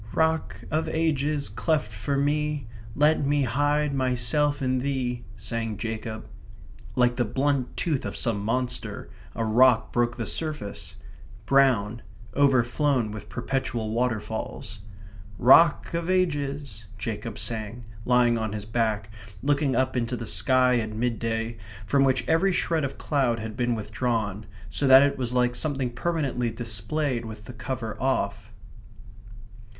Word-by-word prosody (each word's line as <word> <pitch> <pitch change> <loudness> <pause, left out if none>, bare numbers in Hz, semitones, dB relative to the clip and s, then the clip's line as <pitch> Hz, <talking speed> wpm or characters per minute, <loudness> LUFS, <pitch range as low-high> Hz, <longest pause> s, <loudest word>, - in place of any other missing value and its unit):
/* 110 +1 -14
"Rock 160 -11 0
of 160 +1 0
Ages, 150 -2 0
cleft 115 +2 -1
for 110 +7 -2
me, 150 0 0 0.3
Let 150 +1 +3
me 145 0 +2
hide 145 +4 +1
myself 135 +3 +1
in 130 -2 0
thee," 125 -3 -2
*/ 110 - -17
sang 115 -3 -3
Jacob. 110 0 -5 0.7
Like 125 -1 +3
the 125 - +3
blunt 130 +3 -1
tooth 150 -6 0
of - - -5
some 110 -5 -1
monster, 125 +3 -2 0.2
a 115 - -1
rock 110 0 +4
broke 120 0 +1
the 115 - -3
surface; 150 -7 -3 0.5
brown; 120 -5 +3 0.3
overflown 130 -2 +2
with 105 -1 -8
perpetual 120 -5 -2
waterfalls. 110 -2 -3 0.3
/* 100 0 -17
"Rock 150 +7 +6
of 170 +1 -2
Ages," 145 -9 -1
*/ 110 - -17
Jacob 110 0 -5
sang, 115 +1 -4 0.2
lying 120 -1 +3
on 110 -2 -2
his 105 -1 -5
back, 110 -2 -1 0.3
looking 140 -2 +2
up 130 +1 +1
into 125 0 -1
the 115 - -5
sky 125 +7 +3
at 110 -1 -4
midday, 115 0 -2 0.3
from 135 +4 +3
which 130 -2 +1
every 165 +4 +3
shred 165 -3 0
of 140 - -3
cloud 130 -6 0
had 110 0 -6
been 120 -1 0
withdrawn, 105 -1 -2 0.2
so 140 - 0
that 135 +1 +9
it 140 -1 0
was 125 -2 -1
like 125 0 +3
something 135 -2 -2
permanently 135 -3 -1
displayed 115 +4 -1
with 110 -2 -9
the 125 - -9
cover 120 -2 -5
off. 110 -5 -1
125 Hz, 145 wpm, -26 LUFS, 110-140 Hz, 0.7 s, that